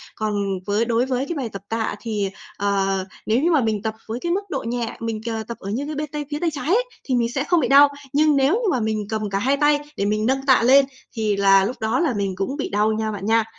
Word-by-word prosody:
còn 215 Hz, -1 st, -2 dB, 0.3 s
với 205 Hz, +3 st, +1 dB
đối 235 Hz, +1 st, +1 dB
với 260 Hz, 0 st, -1 dB
cái 340 Hz, -, -2 dB
bài 255 Hz, -5 st, -3 dB
tập 195 Hz, -2 st, -8 dB
tạ 225 Hz, 0 st, -1 dB
thì, 210 Hz, -4 st, -2 dB, 0.3 s
ờ, 195 Hz, -1 st, 0 dB, 0.2 s
nếu 225 Hz, +4 st, +2 dB
như 345 Hz, -, +3 dB
mà 305 Hz, -4 st, +4 dB
mình 220 Hz, -3 st, 0 dB
tập 220 Hz, +1 st, -3 dB
với 225 Hz, +2 st, -4 dB
cái 340 Hz, +5 st, -2 dB
mức 380 Hz, +3 st, +1 dB
độ 275 Hz, -, -3 dB
nhẹ, 235 Hz, -1 st, -3 dB
mình, 225 Hz, -1 st, -3 dB
ờ, 225 Hz, -1 st, -3 dB
tập 235 Hz, -, -6 dB
ở 195 Hz, -, -7 dB
như 245 Hz, +8 st, -2 dB
cái 305 Hz, +1 st, -5 dB
bên 300 Hz, +1 st, -3 dB
tay 295 Hz, -1 st, -3 dB
phía 295 Hz, -, -2 dB
tay 340 Hz, -, +1 dB
trái 290 Hz, -1 st, -5 dB
ấy, 430 Hz, +9 st, +3 dB, 0.2 s
thì 260 Hz, -, -1 dB
mình 235 Hz, -1 st, +1 dB
sẽ 270 Hz, -, 0 dB
không 350 Hz, +3 st, +2 dB
bị 260 Hz, -, +1 dB
đau. 280 Hz, +2 st, +7 dB, 0.2 s
Nhưng 300 Hz, +1 st, +4 dB
nếu 275 Hz, +2 st, +3 dB
như 450 Hz, -1 st, +1 dB
mà 255 Hz, -, +1 dB
mình 215 Hz, -1 st, -1 dB
cầm 215 Hz, -1 st, -2 dB
cả 195 Hz, 0 st, -1 dB
hai 265 Hz, +7 st, +1 dB
tay 295 Hz, 0 st, +3 dB, 0.2 s
để 200 Hz, -, 0 dB
mình 215 Hz, +1 st, 0 dB
nâng 270 Hz, +2 st, 0 dB
tạ 260 Hz, -3 st, +5 dB
lên 270 Hz, +3 st, +6 dB, 0.3 s
thì 215 Hz, -2 st, 0 dB
là 195 Hz, -1 st, +5 dB
lúc 240 Hz, +6 st, -3 dB
đó 220 Hz, +5 st, 0 dB
là 325 Hz, -7 st, +1 dB
mình 200 Hz, -3 st, -2 dB
cũng 195 Hz, +9 st, -3 dB
bị 285 Hz, -, -3 dB
đau 210 Hz, +2 st, +2 dB
nha 220 Hz, 0 st, -1 dB
bạn 200 Hz, -2 st, -6 dB
nha. 225 Hz, +1 st, +3 dB
230 Hz, 285 wpm, -22 LUFS, 215-280 Hz, 0.3 s, đau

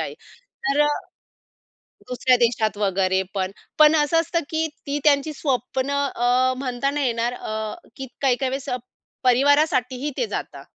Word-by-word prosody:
आहे. -, -, -4 dB, 0.5 s
तर 275 Hz, +2 st, +1 dB
अ, -, -, +2 dB, 1.2 s
दुसऱ्या 250 Hz, 0 st, +3 dB
देशात 225 Hz, -3 st, +1 dB
वगैरे 190 Hz, -2 st, +1 dB
पण. 190 Hz, -1 st, -1 dB, 0.3 s
पण 305 Hz, +1 st, +7 dB
असं 300 Hz, +2 st, +3 dB
असतं 335 Hz, +1 st, 0 dB
की 320 Hz, 0 st, 0 dB, 0.2 s
ती 285 Hz, +1 st, -1 dB
त्यांची 295 Hz, 0 st, +3 dB
स्वप्न 265 Hz, -1 st, -1 dB
अ, 255 Hz, -2 st, +1 dB
म्हणता 255 Hz, 0 st, -1 dB
नाही 290 Hz, -1 st, -1 dB
येणार, 235 Hz, 0 st, -1 dB
अ, 215 Hz, -2 st, -4 dB, 0.2 s
की 270 Hz, -1 st, -6 dB
काही-काही 265 Hz, -1 st, +2 dB
वेळेस 270 Hz, +1 st, -4 dB, 0.5 s
परिवारासाठी 260 Hz, 0 st, +3 dB
ही 300 Hz, -, 0 dB
ते -, -, +1 dB
जातात. -, -, -6 dB
260 Hz, 145 wpm, -23 LUFS, 240-285 Hz, 1.2 s, पण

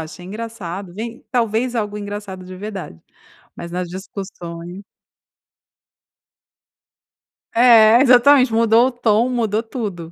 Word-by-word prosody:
achei 160 Hz, +3 st, -9 dB
engraçado", 200 Hz, -3 st, -7 dB
vem 230 Hz, +3 st, -7 dB
talvez 235 Hz, 0 st, 0 dB
algo 210 Hz, -3 st, -2 dB
engraçado 205 Hz, -2 st, -7 dB
de 185 Hz, +1 st, -10 dB
verdade, 195 Hz, -, -8 dB, 0.6 s
mas 170 Hz, -, -8 dB
nas 180 Hz, 0 st, -3 dB
discussões 180 Hz, -1 st, -8 dB, 2.7 s
É, 230 Hz, -1 st, +6 dB
exatamente. 255 Hz, -1 st, +5 dB
Mudou 230 Hz, +2 st, +4 dB
o -, -, -2 dB
tom, 235 Hz, -1 st, +1 dB
mudou 225 Hz, -3 st, -1 dB
tudo. 200 Hz, -9 st, -6 dB
215 Hz, 105 wpm, -19 LUFS, 185-235 Hz, 2.7 s, É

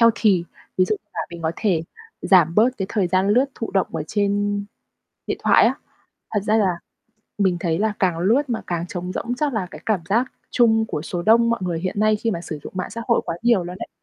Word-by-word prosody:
healthy, 220 Hz, -6 st, +4 dB, 0.3 s
ví 185 Hz, -, +6 dB
dụ 215 Hz, -, 0 dB
như -, -, -49 dB
là -, -, -2 dB
mình 170 Hz, -1 st, -8 dB
có 160 Hz, -, 0 dB
thể 185 Hz, -7 st, +1 dB, 0.4 s
giảm 170 Hz, -3 st, +4 dB
bớt 230 Hz, +4 st, +5 dB
cái 195 Hz, -, -2 dB
thời 200 Hz, -5 st, 0 dB
gian 185 Hz, +2 st, +1 dB
lướt 245 Hz, +6 st, +4 dB
thụ 225 Hz, -, -5 dB
động 195 Hz, -2 st, +1 dB
ở -, -, -2 dB
trên 205 Hz, 0 st, 0 dB, 0.6 s
điện -, -, -2 dB
thoại -, -, +6 dB
á. -, -, +2 dB, 0.6 s
Thật 205 Hz, -, +2 dB
ra 215 Hz, +1 st, +2 dB
là 195 Hz, -4 st, +3 dB, 0.7 s
mình 190 Hz, -3 st, +2 dB
thấy 165 Hz, -1 st, 0 dB
là 215 Hz, 0 st, +1 dB
càng 180 Hz, -4 st, +1 dB
lướt 225 Hz, +11 st, +3 dB
mà 230 Hz, -, -1 dB
càng 170 Hz, -1 st, -2 dB
trống 180 Hz, +1 st, -5 dB
rỗng 245 Hz, +1 st, -3 dB
chắc 285 Hz, -2 st, -1 dB
là 195 Hz, -4 st, -1 dB
cái -, -, -10 dB
cảm 215 Hz, -5 st, +1 dB
giác 235 Hz, +6 st, +1 dB, 0.2 s
chung 225 Hz, -2 st, +3 dB
của 150 Hz, -, -4 dB
số 175 Hz, +1 st, -4 dB
đông 230 Hz, +3 st, +4 dB
mọi 235 Hz, -3 st, 0 dB
người 170 Hz, -3 st, -2 dB
hiện 185 Hz, +3 st, -2 dB
nay 215 Hz, 0 st, +4 dB
khi 225 Hz, +2 st, -1 dB
mà 170 Hz, -5 st, -3 dB
sử 155 Hz, -3 st, -6 dB
dụng -, -, -8 dB
mạng 185 Hz, -, -3 dB
xã 230 Hz, -, -6 dB
hội 235 Hz, -, +4 dB
quá 165 Hz, -, -3 dB
nhiều 235 Hz, -7 st, +3 dB
luôn 180 Hz, +1 st, -6 dB
ấy. -, -, -10 dB
200 Hz, 245 wpm, -22 LUFS, 180-225 Hz, 0.7 s, ví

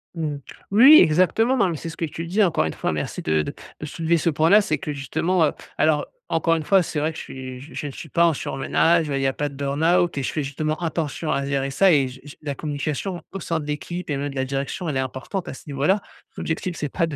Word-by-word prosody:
Mmh 165 Hz, -1 st, -2 dB
mh. -, -, -8 dB, 0.3 s
Oui, 265 Hz, +10 st, +9 dB
exactement, 185 Hz, +10 st, +3 dB
non, 195 Hz, -6 st, +3 dB
mais 165 Hz, -, -3 dB
c'est 165 Hz, -, -6 dB
ce 160 Hz, -, -10 dB
que 165 Hz, -, -1 dB
je -, -, -15 dB
te -, -, -6 dB
disais, 185 Hz, +6 st, +1 dB
encore 165 Hz, -, +2 dB
une 80 Hz, -, -3 dB
fois, -, -, -2 dB
merci 75 Hz, -1 st, -3 dB
de 80 Hz, 0 st, +1 dB
de -, -, -5 dB, 0.3 s
de -, -, -5 dB
soulever 165 Hz, +1 st, 0 dB
ce 165 Hz, -, +1 dB
point-là, 165 Hz, +7 st, +5 dB
c'est -, -, -1 dB
que 150 Hz, -6 st, -4 dB
justement, 160 Hz, +5 st, +1 dB
heu, -, -, +1 dB, 0.3 s
alors 155 Hz, -1 st, +2 dB, 0.2 s
encore 165 Hz, 0 st, +2 dB
1 160 Hz, -, -2 dB
fois, 190 Hz, +3 st, +4 dB
c'est 155 Hz, -, -3 dB
vrai 155 Hz, +2 st, 0 dB
que -, -, -10 dB
je -, -, -6 dB
suis 130 Hz, -1 st, -8 dB
je 150 Hz, +1 st, -7 dB
ne -, -, -5 dB
suis 160 Hz, -, -9 dB
pas 170 Hz, +5 st, +4 dB
en 165 Hz, -, +4 dB
surmenage, 160 Hz, +4 st, +1 dB
bah, 140 Hz, -2 st, -1 dB
il -, -, -1 dB
y 135 Hz, -, +2 dB
a 135 Hz, -, 0 dB
pas 145 Hz, +1 st, -2 dB
de 140 Hz, -, -12 dB
burn-out 160 Hz, +5 st, +1 dB
et 140 Hz, -, -1 dB
je -, -, -1 dB
fais 150 Hz, -, -2 dB
justement 155 Hz, +3 st, -2 dB
attention 160 Hz, -1 st, -2 dB
à 140 Hz, -, 0 dB
gérer 140 Hz, -1 st, -1 dB
ça 190 Hz, +7 st, +4 dB
et, 140 Hz, -5 st, +4 dB
je 130 Hz, +1 st, -10 dB
je 145 Hz, 0 st, -11 dB
la 145 Hz, -2 st, -4 dB
communication 155 Hz, +5 st, -3 dB
au 195 Hz, -, -5 dB
sein 170 Hz, -2 st, -2 dB
de 150 Hz, -, -6 dB
l'équipe 160 Hz, +5 st, -5 dB
et 145 Hz, -, 0 dB
même 145 Hz, +1 st, -2 dB
de 140 Hz, -, -9 dB
la 130 Hz, -1 st, 0 dB
direction, 140 Hz, +6 st, -3 dB
elle 140 Hz, -, -1 dB
est -, -, +1 dB
importante 130 Hz, +8 st, -4 dB
à -, -, -5 dB
ce -, -, -12 dB
niveau-là. 150 Hz, +8 st, +1 dB, 0.4 s
L'objectif, 165 Hz, +2 st, -3 dB
c'est 150 Hz, -, -3 dB
pas 165 Hz, -, 0 dB
de 155 Hz, -, -5 dB
155 Hz, 280 wpm, -23 LUFS, 140-170 Hz, 0.4 s, Oui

